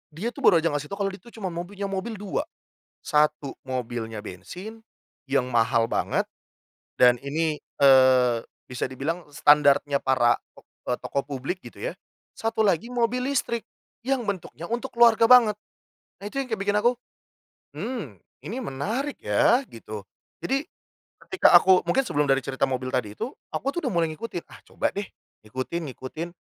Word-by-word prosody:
Dia 220 +8 -2
tuh - - -11
baru 170 -4 +6
aja 165 - +3
ngasih 145 0 -3
tau, 200 - -4
kalau 195 - +1
dia 195 - -9
itu 240 - -21
cuma 195 -5 -4
mobilnya, 195 +4 -5
mobil 195 +4 -3
2. 205 +9 -3 0.6
Satu 150 -2 +1 0.2
mobilnya 115 -4 -4
bensin, 180 - -9 0.5
yang 130 -2 0
mahal 115 0 +3
banget, - - +1 0.7
dan 125 -1 +6
ini, 150 +1 -1 0.2
eee, 130 -3 +6 0.3
bisa 125 - -3
dibilang 160 +7 -3
standarnya 145 -1 +4
para 125 -3 +3 0.2
tok - - -17 0.2
eee, 125 - +1
tokoh 140 - -2
publik, 140 +7 -4
gitu - - -12
ya, - - -11 0.4
satu 225 0 -1
lagi 200 +5 +1
mobil 245 +1 0
listrik 235 -4 -1 0.4
yang 260 -3 0
bentuknya 180 -3 -4
untuk 240 +3 -3
keluarga 230 -1 +6
banget. 235 -5 +7 0.7
Nah, - - -10
itu 275 - -13
yang 255 - -9
kayak 220 -3 -2
bikin 205 +1 +1
aku, 240 +3 +4 0.9
"Mmm, 200 - -5 0.3
ini 230 +6 -4
menarik 230 - -3
ya," 275 -4 +3
gitu. 110 -2 -8 0.4
Jadi, 275 +3 0 0.6
ketika 375 - +4
aku 185 +1 +6
mungkin 270 - +3
sebelum 145 0 +1
dari 135 0 +3
cerita 135 0 0
mobil 130 0 -2
tadi 105 -5 -1
itu, 255 - -3 0.2
aku 275 - -2
tuh 345 - -1
udah - - 0
mulai 165 -1 +2
ngikutin. 175 0 -5
"Ah, - - -13
coba - - -1
deh, 200 0 -3 0.4
ikutin, 135 +7 -4
ngikutin," 155 +7 -6
165 Hz, 165 wpm, -25 LUFS, -, 0.9 s, banget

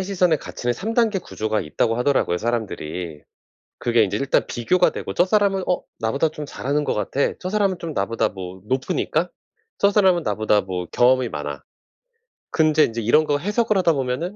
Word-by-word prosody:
남의 190 - -2
시선에 180 -4 +2
갇히는 120 -3 -3
3 215 - -4
단계 225 -5 +2
구조가 110 -9 -2
있다고 115 +9 -1
하더라고요, 125 -8 +1
사람들이. 90 -8 -4 0.6
그게 120 -2 +3
인제 95 - -1
일단 140 0 +1
비교가 120 +10 +2
되고 - - -5
'저 175 - +3
사람은 195 -1 +2
어 180 - +1 0.2
나보다 140 +8 +1
좀 150 -1 -7
잘하는 145 +1 -2
것 - - -1
같아. 135 +6 0
저 185 - -4
사람은 200 -3 +1
좀 165 -2 -5
나보다 100 +4 0
뭐 95 -1 -8
높으니까. 135 +7 -1 0.5
저 200 - +4
사람은 190 -5 +3
나보다 105 0 +1
뭐 90 -1 -4
경험이 125 0 +3
많아.' 75 -1 -5 0.9
근데 155 -1 +4
인제 115 0 -4
이런 150 +8 +4
거 145 -1 +1
해석을 210 +5 0
하다 170 -3 +3
보면은 135 +8 -2
140 Hz, 385 characters per minute, -22 LUFS, 110-180 Hz, 0.9 s, 저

